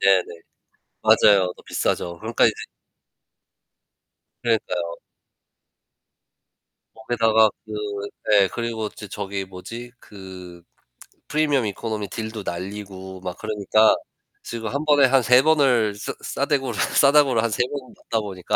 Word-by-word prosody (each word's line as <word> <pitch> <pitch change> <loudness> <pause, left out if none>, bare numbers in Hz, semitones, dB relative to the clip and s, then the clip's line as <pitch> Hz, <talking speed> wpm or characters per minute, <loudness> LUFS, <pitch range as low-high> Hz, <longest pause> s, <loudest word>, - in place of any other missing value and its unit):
네네. 95 -2 +4 0.8
맞아요. 95 -3 +5
더 - - -16
비싸죠. 85 -1 -2
그러니까 - - +1
이제 - - +3 1.9
그러니까요. 90 -7 -1 2.0
거기다가 110 -1 +3 0.2
그 110 - -8 0.6
예. 100 -2 +6
그리고 115 -2 -3
저 105 - -10
저기 100 -1 -4
뭐지? 115 +6 -9
그 90 -3 -11 0.6
프리미엄 150 -5 +1
이코노미 105 0 -4
딜도 110 0 -5
날리고 95 +1 -6
막 90 -1 -6
그러니까 110 +1 +3 0.5
지금 115 -1 -5
1 140 +5 -3
번에 145 -2 +5
한 135 +1 +4
3 125 +2 +6
번을 130 -9 +3
싸 105 - -5
싸대구를 135 -6 -1
싸다구를 140 -5 +4
한 115 - +1
3 110 +3 +1
번은 140 -3 -7
맞다 115 - -2
보니까 95 -4 -3
110 Hz, 250 characters per minute, -23 LUFS, 95-120 Hz, 2.0 s, 예